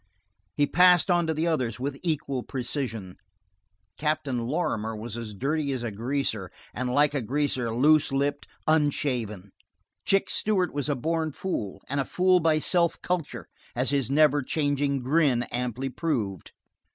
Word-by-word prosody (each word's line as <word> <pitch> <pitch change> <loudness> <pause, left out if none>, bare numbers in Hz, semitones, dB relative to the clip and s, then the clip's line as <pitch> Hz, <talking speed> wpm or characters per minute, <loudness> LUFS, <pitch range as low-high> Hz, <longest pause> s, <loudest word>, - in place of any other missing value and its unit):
He 145 - +3
passed 180 +3 +5
on 175 -1 +2
to 160 - +1
the 160 +2 0
others 130 -10 -1
with 135 +1 -3
equal 145 -6 -2
precision. 120 -7 -4 0.8
Captain 145 -6 -1
Lorrimer 110 -7 -1
was 110 +1 -6
as 115 -3 -6
dirty 140 +5 -1
as 125 -2 -4
a 120 - -3
greaser; 110 -3 -2 0.2
and 125 0 -2
like 145 +2 +3
a 140 - 0
greaser, 130 -1 -1
loose 145 +6 +4
lipped, 140 +1 -1 0.2
unshaven. 125 - 0 0.5
Chick 195 0 +2
Stewart 190 -5 +1
was 145 0 -2
a 145 - +1
born 160 +3 -1
fool, 105 - -4
and 140 +1 -2
a 135 - 0
fool 185 0 +3
by 160 -2 +3
self 170 +2 +1
culture, 150 - -2 0.3
as 130 +3 +1
his 140 -4 +1
never 145 0 +4
changing 145 -1 0
grin 135 -3 +2
amply 125 +2 -2
proved. 120 - -3
140 Hz, 150 wpm, -26 LUFS, 120-155 Hz, 0.8 s, passed